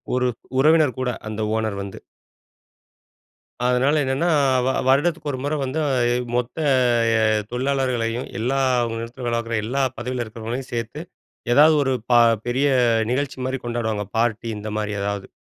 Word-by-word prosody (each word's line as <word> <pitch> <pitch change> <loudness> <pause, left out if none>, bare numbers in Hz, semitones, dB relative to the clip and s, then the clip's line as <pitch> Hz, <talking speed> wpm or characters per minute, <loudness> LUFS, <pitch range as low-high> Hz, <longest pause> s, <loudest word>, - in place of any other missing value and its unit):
ஒரு 125 0 +1 0.3
உறவினர் 155 -1 +4
கூட 130 - 0 0.2
அந்த 110 0 -4
ஓனர் 110 -3 -2
வந்து. 100 -1 -8 1.7
அதனால 125 +4 +2
என்னென்னா, 135 +6 0 0.4
வ - - +2 0.2
வருடத்துக்கு 150 +3 +2
ஒரு 130 - -5
முறை 145 +2 -1
வந்து 135 +4 -2 0.6
மொத்த 125 +5 -2 0.9
தொழிலாளர்களையும், 125 -2 -1
எல்லா 130 +4 0 0.3
நிறுவனத்துல 115 +3 -6
வேலப்பாக்குற 115 -1 -1
எல்லா 135 +5 -1 0.2
பதவியில 125 -1 -3
இருக்கிறவங்களையும் 115 +4 -6
சேர்த்து, 115 +6 -4 0.5
ஏதாவது 155 +3 +6
ஒரு 135 -1 0 0.2
ப - - +5 0.3
பெரிய 130 +4 +1 0.4
நிகழ்ச்சிமாரி 130 -1 -2
கொண்டாடுவாங்க. 110 -3 -2
பார்ட்டி 115 0 0
இந்தமாரி 105 0 -3
ஏதாவது. 100 -1 -3
125 Hz, 120 wpm, -22 LUFS, 115-135 Hz, 1.7 s, ஏதாவது